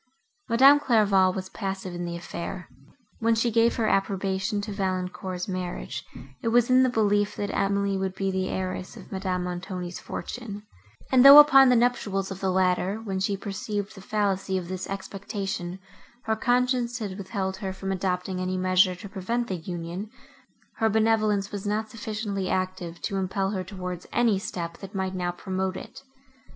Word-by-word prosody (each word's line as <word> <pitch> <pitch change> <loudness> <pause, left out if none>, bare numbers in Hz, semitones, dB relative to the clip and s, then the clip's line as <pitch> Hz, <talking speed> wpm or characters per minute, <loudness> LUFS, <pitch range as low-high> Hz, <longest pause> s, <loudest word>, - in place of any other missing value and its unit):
Madame 270 +5 +7
Clairval 200 -8 +4
was 185 0 -5
passive 190 -3 -4
in 175 0 -4
the 170 0 -4
affair. 170 0 -6 0.5
When 230 0 +3
she 230 +1 +1
gave 230 +1 +3
her 225 -3 0
approbation 195 +1 0
to 210 - -5
Valancourt's 185 -1 -3
marriage, 180 - -4 0.4
it - - -3
was 240 +1 +3
in 255 0 +6
the 260 - +4
belief, 205 -3 +1
that 205 - -3
Emily 200 0 +1
would 190 0 -2
be 195 0 -1
the 190 0 -1
heiress 185 0 -4
of - - -13
Madame 185 -2 -2
Montoni's 180 0 -5
fortune; 210 -4 -6 0.5
and, 255 -1 +6
though, 280 +1 +12
upon 270 -3 +9
the 250 - +5
nuptials 205 -5 +1
of 190 - -6
the 190 - 0
latter, 185 +1 +2
when 195 -4 -3
she 195 +1 0
perceived 205 +1 -4
the 195 - -12
fallacy 195 -2 0
of 180 -2 -5
this 185 0 -5
expectation, 195 -2 -4 0.5
her 220 - 0
conscience 245 +1 +1
had 205 -5 -4
withheld 190 -1 -3
her 190 -1 -4
from 190 0 -4
adopting 185 0 -2
any 185 0 -1
measure 185 0 +3
to 200 +3 -9
prevent 220 +5 -2
the 190 - -1
union, 175 +4 -6 0.7
her 225 - +2
benevolence 215 -2 +2
was 205 0 -5
not 215 +1 -1
sufficiently 210 -4 -3
active 185 -2 -2
to 195 - -1
impel 190 +1 -1
her 190 -3 -2
towards 180 -2 -6
any 230 -5 +2
step, 170 -4 -5
that 195 +1 -10
might 190 -1 -1
now 180 -1 -1
promote 185 +1 -3
it. - - -10
195 Hz, 170 wpm, -26 LUFS, 185-215 Hz, 0.7 s, though